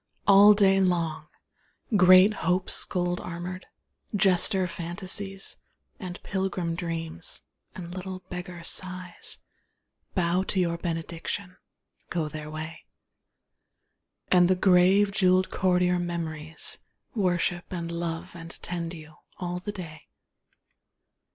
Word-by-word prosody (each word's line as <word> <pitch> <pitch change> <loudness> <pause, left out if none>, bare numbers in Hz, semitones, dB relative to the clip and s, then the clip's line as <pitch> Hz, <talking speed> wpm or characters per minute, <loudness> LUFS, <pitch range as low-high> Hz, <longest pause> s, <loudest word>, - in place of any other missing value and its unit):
All 205 +1 +8
day 195 -1 +4
long 165 -4 0 0.7
Great 185 +1 +7
Hopes 185 -2 +1
gold 175 -1 -1
armoured, 180 +2 -6 0.5
jester 190 -1 +3
Fantasies, 185 +3 -2 0.4
And 180 -3 -6
pilgrim 190 -3 -2
Dreams, 165 -1 -5 0.3
and 175 -1 -7
little 185 0 -6
beggar 180 -1 -7
Sighs, 180 0 -4 0.8
Bow 180 0 +2
to 190 0 -1
your 170 -2 0
benediction, 170 +3 -4 0.5
go 165 -3 -1
their 150 0 -7
way. 155 +1 -7 1.5
And 180 -1 +6
the 185 - +4
grave 190 +2 +5
jewelled 185 -2 +3
courtier 180 -1 +2
Memories 160 -2 -4 0.3
Worship 180 -3 0
and 170 -2 -4
love 170 0 -4
and 165 -1 -9
tend 170 -1 -4
you, 155 -1 -13 0.2
all 180 0 -3
the 205 +3 -5
day. 170 -6 -9
180 Hz, 105 wpm, -27 LUFS, 170-185 Hz, 1.5 s, All